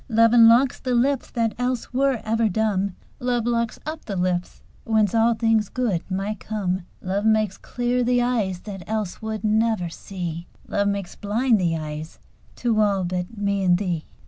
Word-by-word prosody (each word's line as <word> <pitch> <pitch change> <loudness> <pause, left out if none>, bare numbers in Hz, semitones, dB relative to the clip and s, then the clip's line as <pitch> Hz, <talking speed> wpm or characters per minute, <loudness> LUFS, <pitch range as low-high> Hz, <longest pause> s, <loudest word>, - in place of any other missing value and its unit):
Love 230 0 +4
unlocks 235 +2 +6
the 255 -1 -1
lips 265 +2 +1
that 230 -3 0
else 250 0 -2
were 265 -2 +1
ever 225 0 +2
dumb: 200 -2 0 0.2
"Love 245 -2 0
locks 235 -1 0
up 310 +1 -5
the 200 - -4
lips 180 -1 -2 0.2
whence 220 -3 +2
all 230 +1 +3
things 220 -2 +2
good 230 -9 0
might 195 +2 -2
come." 190 -4 -3 0.2
Love 195 +2 -1
makes 215 -3 +2
clear 245 0 -1
the 245 0 +2
eyes 220 -7 0
that 195 -3 -7
else 215 -4 -3
would 220 0 -4
never 215 -4 +1
see: 170 -1 -6 0.2
"Love 200 0 0
makes 200 -2 -3
blind 220 +1 +1
the 165 -2 +1
eyes 155 0 -6 0.4
to 230 -3 0
all 200 -2 +2
but 180 +4 -3
me 200 -1 0
and 180 -1 +4
thee." 175 -5 -2
215 Hz, 170 wpm, -23 LUFS, 190-235 Hz, 0.4 s, unlocks